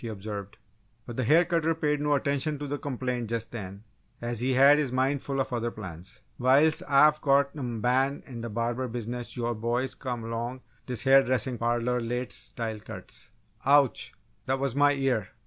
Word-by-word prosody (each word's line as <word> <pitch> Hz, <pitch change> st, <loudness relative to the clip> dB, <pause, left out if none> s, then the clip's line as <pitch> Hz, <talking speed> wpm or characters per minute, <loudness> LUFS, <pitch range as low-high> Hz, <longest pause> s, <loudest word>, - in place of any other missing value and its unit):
he 120 Hz, -, -5 dB
observed, 100 Hz, -2 st, -6 dB, 0.5 s
but 120 Hz, -, -7 dB
the 130 Hz, -, -1 dB
hair 160 Hz, +9 st, +5 dB
cutter 165 Hz, -2 st, +1 dB
paid 150 Hz, -2 st, 0 dB
no 150 Hz, 0 st, +2 dB
attention 145 Hz, +2 st, 0 dB
to 145 Hz, -, -5 dB
the 145 Hz, +1 st, -3 dB
complaint 125 Hz, -4 st, -3 dB
just 115 Hz, -1 st, -3 dB
then 100 Hz, -3 st, -7 dB, 0.4 s
as 120 Hz, -1 st, -3 dB
he 130 Hz, +2 st, +1 dB
had 140 Hz, +3 st, +7 dB
his 140 Hz, -4 st, -1 dB
mind 130 Hz, +2 st, +1 dB
full 135 Hz, -1 st, -3 dB
of 130 Hz, -, -1 dB
other 120 Hz, -1 st, -1 dB
plans. 95 Hz, -4 st, -9 dB, 0.2 s
"Whiles 140 Hz, +5 st, +4 dB
Ah've 150 Hz, +2 st, +5 dB
got 140 Hz, 0 st, +3 dB
m' 120 Hz, -6 st, -4 dB
ban' 130 Hz, +4 st, +1 dB
in 120 Hz, -4 st, -8 dB
th' 115 Hz, -1 st, -5 dB
barber 120 Hz, +3 st, -1 dB
business 120 Hz, +1 st, -5 dB
all 120 Hz, -, -1 dB
yo' -, -, 0 dB
boys 120 Hz, +4 st, -1 dB
come 125 Hz, -4 st, -5 dB
along 120 Hz, +3 st, -4 dB
t' -, -, -36 dB, 0.2 s
dis 125 Hz, -3 st, -4 dB
ha'r 135 Hz, 0 st, +7 dB
dressin' 125 Hz, -1 st, -1 dB
parloh 120 Hz, +1 st, 0 dB
lates' 120 Hz, +2 st, -2 dB
style 110 Hz, -2 st, -4 dB
cuts!" 105 Hz, -3 st, -9 dB, 0.3 s
"Ouch! 140 Hz, -1 st, +3 dB, 0.3 s
that 130 Hz, +1 st, +1 dB
was 135 Hz, -2 st, -1 dB
my 145 Hz, 0 st, +5 dB
ear. 130 Hz, -7 st, 0 dB
125 Hz, 195 wpm, -28 LUFS, 115-140 Hz, 0.5 s, had